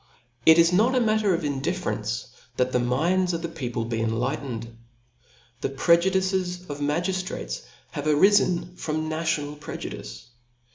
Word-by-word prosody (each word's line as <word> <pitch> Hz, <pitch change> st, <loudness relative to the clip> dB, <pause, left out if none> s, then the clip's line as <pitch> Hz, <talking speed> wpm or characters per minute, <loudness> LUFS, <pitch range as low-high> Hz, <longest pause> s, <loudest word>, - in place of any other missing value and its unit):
Jt 160 Hz, -, +10 dB
is 170 Hz, +1 st, +5 dB
not 225 Hz, +8 st, +4 dB
a -, -, +4 dB
matter 215 Hz, -4 st, +2 dB
of 165 Hz, -, -4 dB
iiidifference, 135 Hz, -, -2 dB, 0.3 s
that 125 Hz, 0 st, +1 dB
the 125 Hz, -, +2 dB
minds 170 Hz, +10 st, +1 dB
pfi 165 Hz, -, -2 dB
the -, -, -1 dB
people, 120 Hz, -7 st, -4 dB
be 115 Hz, -1 st, -2 dB
enlightened^ 115 Hz, 0 st, -2 dB, 0.9 s
The -, -, -1 dB
prejudices 180 Hz, +4 st, +2 dB
of 145 Hz, -, -6 dB
magiftratea 155 Hz, -, -2 dB, 0.3 s
have 145 Hz, -, -5 dB
arifen 180 Hz, +2 st, +3 dB
from 155 Hz, 0 st, -2 dB
.national 155 Hz, -2 st, -1 dB
projudice. -, -, -7 dB
155 Hz, 135 wpm, -25 LUFS, 130-180 Hz, 0.9 s, Jt